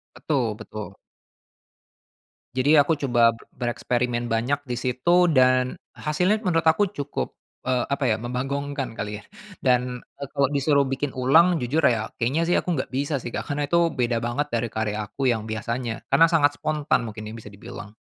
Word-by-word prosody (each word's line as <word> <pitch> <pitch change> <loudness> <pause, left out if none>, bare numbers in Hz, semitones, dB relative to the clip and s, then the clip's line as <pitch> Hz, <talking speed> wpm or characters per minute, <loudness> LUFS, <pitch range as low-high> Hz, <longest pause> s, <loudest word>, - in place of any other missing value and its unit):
Betul 125 -8 -1
betul. 105 -4 -8 1.6
Jadi 135 +3 +2
aku 145 +3 +2
coba 120 -3 +1 0.2
b - - -17 0.2
bereksperimen 120 0 -1
banyak 125 +6 +1
di 120 - -1
situ 130 +6 -1 0.3
dan 130 0 +4 0.2
hasilnya 180 +8 0
menurut 165 -3 +1
aku 165 +5 +4
cukup, 145 0 -4 0.3
eee, 125 -2 +2
apa 140 -1 0
ya 110 - +2
membanggongkan 135 +2 -3
kali 105 0 -4
ya, - - -20 0.4
dan, 125 -1 +1 0.2
eee, 140 -1 -6
kalau 140 -2 +2
disuruh 140 0 +2
bikin 135 +1 -2
ulang 160 +7 +4
jujur 140 +6 0
ya 110 -2 +2
kayaknya 130 +8 0
sih 175 - +3
aku - - -1
nggak 130 - -2
bisa 140 +3 -1
sih, - - -6
Kak, - - -2
karena 145 0 -1
tuh 170 +1 +3 0.2
beda 120 -1 +1
banget 140 +5 -1
dari 115 0 0
karya 110 -1 -1
aku 130 +5 -2
yang 110 -2 -2
biasanya, 115 +1 -3
karena 165 - +5
sangat 145 -2 +3
spontan 155 -1 0
mungkin 110 -1 -7
ya 110 - -7
bisa 105 -2 -11
dibilang. 115 +1 -9
130 Hz, 175 wpm, -24 LUFS, 120-145 Hz, 1.6 s, karena